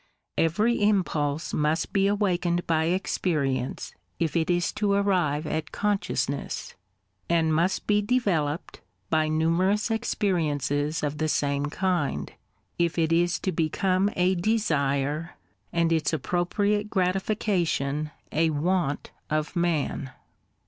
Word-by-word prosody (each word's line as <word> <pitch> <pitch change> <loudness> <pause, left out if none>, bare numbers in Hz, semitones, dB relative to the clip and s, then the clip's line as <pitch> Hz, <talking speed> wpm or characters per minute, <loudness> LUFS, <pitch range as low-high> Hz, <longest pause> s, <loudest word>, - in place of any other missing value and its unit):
Every 210 +9 +2
impulse 165 -7 +1
must 155 +2 0
be 195 -1 +3
awakened 180 -4 +1
by 160 -1 +1
experience 150 -7 -1 0.2
if 165 -1 -1
it 165 +1 +1
is 175 0 +1
to 205 -2 +1
arrive 180 -7 +1
at 155 0 -3
consciousness, 195 -10 -2 0.6
and 165 -2 +2
must 170 +4 +1
be 210 0 +3
developed 190 -10 -1 0.3
by 155 0 +3
numerous 170 +8 +1
experiences 155 - 0
of 150 0 -2
the 155 - +1
same 145 -1 0
kind, 150 - -1 0.5
if 170 0 +1
it 165 -1 +2
is 175 +2 +2
to 190 - 0
become 185 +4 +1
a 180 +1 +3
desire, 155 -6 0 0.4
and 170 -1 +1
its 160 0 +1
appropriate 200 - 0
gratification 180 -6 0 0.2
a 160 +2 +2
want 155 -1 -1 0.2
of 155 0 -1
man. 165 -5 0
170 Hz, 115 wpm, -26 LUFS, 150-190 Hz, 0.6 s, be